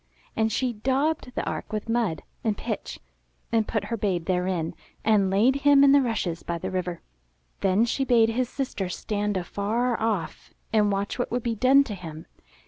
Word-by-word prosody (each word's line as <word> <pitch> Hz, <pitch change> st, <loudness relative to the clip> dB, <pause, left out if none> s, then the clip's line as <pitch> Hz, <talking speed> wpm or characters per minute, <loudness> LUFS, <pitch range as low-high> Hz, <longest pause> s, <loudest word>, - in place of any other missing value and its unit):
And 220 Hz, 0 st, +1 dB
she 250 Hz, +3 st, 0 dB
daubed 265 Hz, +5 st, 0 dB
the -, -, -2 dB
ark -, -, -4 dB
with 215 Hz, +1 st, -3 dB
mud 225 Hz, -9 st, 0 dB, 0.2 s
and 215 Hz, -3 st, 0 dB
pitch -, -, -5 dB, 0.5 s
and 225 Hz, -2 st, +2 dB
put 215 Hz, -3 st, -1 dB
her -, -, 0 dB
babe 185 Hz, -5 st, -1 dB
therein, 180 Hz, -2 st, -1 dB, 0.3 s
and 210 Hz, -3 st, +4 dB
laid 225 Hz, +8 st, +3 dB
him 280 Hz, 0 st, +5 dB
in 280 Hz, -, +7 dB
the 280 Hz, 0 st, +6 dB
rushes 210 Hz, -9 st, -2 dB
by 170 Hz, -, -3 dB
the -, -, -5 dB
river. 180 Hz, -2 st, -3 dB, 0.6 s
Then 195 Hz, +4 st, +3 dB
she 265 Hz, +3 st, 0 dB
bade 235 Hz, -4 st, +4 dB
his 245 Hz, +2 st, -1 dB
sister 250 Hz, -10 st, -3 dB
stand 205 Hz, +2 st, -2 dB
afar 220 Hz, +7 st, -1 dB
off 215 Hz, -7 st, -2 dB, 0.2 s
and 210 Hz, -2 st, +4 dB
watch 200 Hz, +4 st, -2 dB
what 245 Hz, -, -1 dB
would 245 Hz, 0 st, -2 dB
be 235 Hz, -, 0 dB
done 260 Hz, +5 st, +5 dB
to 230 Hz, -, -6 dB
him. 165 Hz, -4 st, -8 dB
220 Hz, 185 wpm, -26 LUFS, 190-245 Hz, 0.6 s, in